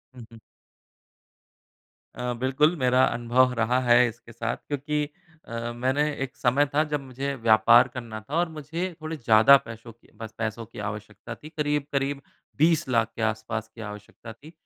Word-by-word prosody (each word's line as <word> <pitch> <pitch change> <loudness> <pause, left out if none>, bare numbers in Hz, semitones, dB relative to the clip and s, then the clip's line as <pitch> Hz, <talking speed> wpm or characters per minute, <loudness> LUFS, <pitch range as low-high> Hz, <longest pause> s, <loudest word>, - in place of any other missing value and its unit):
हुँ, 120 -2 -10
हुँ। 115 - -13 1.7
अ, 125 0 -3
बिल्कुल, 140 +6 +2
मेरा 130 -1 +3
अनुभव 125 +2 +2
रहा 120 +3 +2
है 120 0 +5
इसके 120 0 -10
साथ 115 +1 -3
क्योंकि 150 +1 -1 0.4
अ, 115 +1 -4
मैंने 130 +4 +1 0.2
एक 130 - -7
समय 130 +4 +2
था, 155 +1 +3
जब 150 -2 -2
मुझे 135 +1 -4
व्यापार 115 +1 +5
करना 120 -3 -7
था 140 +8 -6
और 170 0 +1
मुझे 160 +3 -5 0.2
थोड़े 155 +1 -5
ज़्यादा 115 +2 +6
पैसों 115 +1 -10
की 115 - -27
बस 110 -1 -7
पैसों 115 0 -3
की 115 - -12
आवश्यकता 105 -1 -7
थी। 155 - -12
करीब-करीब 145 -2 -2 0.4
20 160 -1 +3
लाख 115 -3 +1
के 115 - -6
आस-पास 110 0 -2
की 115 - -9
आवश्यकता 105 +2 -9
थी। 145 +7 -15
125 Hz, 165 wpm, -26 LUFS, 115-145 Hz, 1.7 s, ज़्यादा